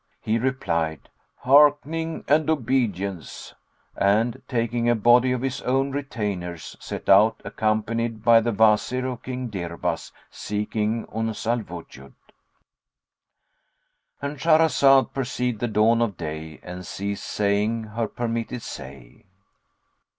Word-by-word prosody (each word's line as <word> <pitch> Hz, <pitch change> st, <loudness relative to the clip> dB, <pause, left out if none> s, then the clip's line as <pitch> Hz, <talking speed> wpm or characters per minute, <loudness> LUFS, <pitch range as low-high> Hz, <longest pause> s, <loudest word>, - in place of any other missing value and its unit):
He 110 Hz, +2 st, 0 dB
replied, 85 Hz, -, -2 dB, 0.3 s
"Hearkening 150 Hz, +4 st, +3 dB
and 155 Hz, +1 st, +3 dB
obedience;" 110 Hz, -, -2 dB, 0.4 s
and, 110 Hz, +4 st, +1 dB
taking 120 Hz, -1 st, 0 dB
a 120 Hz, -, +4 dB
body 120 Hz, +3 st, +4 dB
of 125 Hz, 0 st, -1 dB
his 135 Hz, 0 st, -2 dB
own 135 Hz, +2 st, 0 dB
retainers, 100 Hz, -, -4 dB
set -, -, -7 dB
out 105 Hz, +3 st, +5 dB
accompanied 110 Hz, +2 st, -1 dB
by 115 Hz, -1 st, +6 dB
the 120 Hz, +1 st, 0 dB
Wazir 110 Hz, +4 st, +2 dB
of 125 Hz, -2 st, -4 dB
King 125 Hz, -1 st, -5 dB
Dirbas 85 Hz, -4 st, -4 dB, 0.2 s
seeking 105 Hz, +2 st, -2 dB
Uns 110 Hz, 0 st, -3 dB
al 120 Hz, +2 st, +1 dB
Wujud.—And 85 Hz, -9 st, -10 dB, 2.2 s
Shahrazad 140 Hz, -5 st, +4 dB
perceived 125 Hz, -3 st, -2 dB
the 120 Hz, -, -1 dB
dawn 110 Hz, +2 st, +3 dB
of 110 Hz, -6 st, -1 dB
day 80 Hz, -1 st, -6 dB
and 90 Hz, +1 st, -8 dB
ceased 100 Hz, +3 st, -5 dB
saying 105 Hz, +2 st, 0 dB
her 110 Hz, +1 st, -3 dB
permitted 115 Hz, +1 st, -4 dB
say. 65 Hz, -2 st, -10 dB
115 Hz, 115 wpm, -24 LUFS, 100-125 Hz, 2.2 s, by